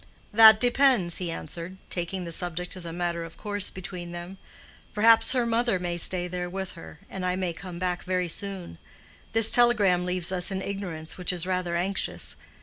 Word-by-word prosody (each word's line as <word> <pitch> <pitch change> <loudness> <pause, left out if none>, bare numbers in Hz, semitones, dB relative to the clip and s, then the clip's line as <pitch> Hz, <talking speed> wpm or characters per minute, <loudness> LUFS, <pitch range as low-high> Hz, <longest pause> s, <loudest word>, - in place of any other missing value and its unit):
"That 220 0 +9
depends," 245 -8 +3
he 180 -2 -3
answered, 170 +2 -7
taking 180 +1 -3
the 170 - -6
subject 180 +1 -1
as 180 -2 -4
a 165 - -5
matter 170 0 -3
of 165 0 -11
course 205 -2 +2
between 180 -2 -8
them. 175 +2 -8 0.6
"Perhaps 225 +2 +5
her 250 -2 +1
mother 230 -2 +1
may 175 -1 -3
stay 175 +1 +2
there 180 0 -4
with 190 +1 -5
her, 165 0 -13
and 190 - -7
I 180 0 0
may 185 -2 -2
come 175 +1 -9
back 180 0 -2
very 180 -1 -1
soon. 185 - -4 0.5
This 225 -1 +4
telegram 210 -7 +4
leaves 180 0 -2
us 180 -1 +2
in 190 -1 -3
ignorance 180 -5 -6
which 180 - 0
is 175 -2 -1
rather 180 -2 -2
anxious. 190 +3 -1
180 Hz, 185 wpm, -26 LUFS, 175-200 Hz, 0.6 s, That